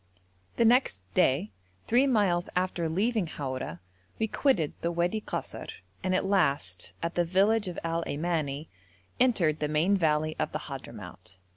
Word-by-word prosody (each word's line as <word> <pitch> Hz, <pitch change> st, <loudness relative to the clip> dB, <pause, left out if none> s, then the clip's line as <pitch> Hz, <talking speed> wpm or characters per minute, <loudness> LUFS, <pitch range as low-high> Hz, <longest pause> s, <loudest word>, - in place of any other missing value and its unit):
The 235 Hz, -, +3 dB
next 230 Hz, -, +3 dB
day, 155 Hz, +11 st, +2 dB, 0.3 s
three 250 Hz, +4 st, +4 dB
miles 200 Hz, -8 st, +2 dB
after 180 Hz, -2 st, 0 dB
leaving 205 Hz, +3 st, +1 dB
Haura, 130 Hz, -, -5 dB, 0.4 s
we 220 Hz, -, 0 dB
quitted 205 Hz, -, +1 dB
the 170 Hz, -, 0 dB
Wadi 175 Hz, +5 st, 0 dB
Kasr -, -, -5 dB, 0.4 s
and 185 Hz, 0 st, +1 dB
at -, -, +1 dB
last, 140 Hz, -, +1 dB
at 170 Hz, +1 st, -1 dB
the 175 Hz, -, +2 dB
village 195 Hz, +5 st, +2 dB
of 180 Hz, -, -5 dB
Alimani, 160 Hz, -2 st, -2 dB, 0.5 s
entered 185 Hz, -12 st, +3 dB
the 150 Hz, -, 0 dB
main 155 Hz, +7 st, +2 dB
valley 155 Hz, -3 st, +1 dB
of -, -, -1 dB
the -, -, -1 dB
Hadhramout. 95 Hz, -, -9 dB
175 Hz, 145 wpm, -29 LUFS, 150-205 Hz, 0.5 s, three